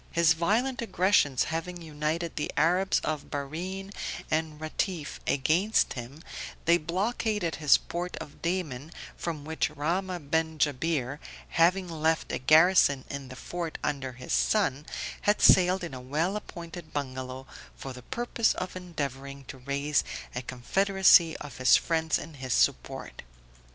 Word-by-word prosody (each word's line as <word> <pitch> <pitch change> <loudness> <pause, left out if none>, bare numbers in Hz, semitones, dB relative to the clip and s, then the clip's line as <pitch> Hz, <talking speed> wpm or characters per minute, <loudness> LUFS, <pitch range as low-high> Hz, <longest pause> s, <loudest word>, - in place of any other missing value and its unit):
His 165 -1 +4
violent 225 +11 0
aggressions 185 - +3
having 170 +2 -4
united 160 +1 -3
the 150 - -2
Arabs 180 +5 +3
of 155 -2 -3
Bahrene 180 +8 -5 0.4
and 155 -1 -1
Ratiffe 155 0 -3
against 165 +10 +2
him 130 +6 -8 0.4
they 170 +1 +5
blockaded 195 +1 -1
his 150 -3 +6
port 175 +1 -5
of 145 - -9
Daman 160 -5 -2 0.2
from 155 -4 -5
which 160 0 -1
Rahmah 165 +1 -3
ben 160 -1 +1
Jabir, 145 -1 0 0.3
having 180 +3 +3
left 160 -1 0
a - - -2
garrison 155 -1 +5
in 140 -1 -5
the 130 - -9
fort 170 +4 -5
under 135 -3 -2
his 125 - -5
son, 60 - +1 0.3
had 205 +1 +2
sailed 185 0 +6
in 170 - -5
a 130 - -7
well 155 +9 -1
appointed 170 -5 -8
bungalow, 130 -2 -4 0.3
for 135 - -7
the 125 - -10
purpose 235 - 0
of 185 0 -5
endeavoring 140 -6 -5
to 135 - -8
raise 140 +3 0 0.3
a 125 - -3
confederacy 175 +6 +4
of 145 - -9
his 130 -2 +6
friends 160 -1 0
in 160 - -8
his 130 -3 -2
support. - - 0
160 Hz, 140 wpm, -28 LUFS, 140-180 Hz, 0.4 s, his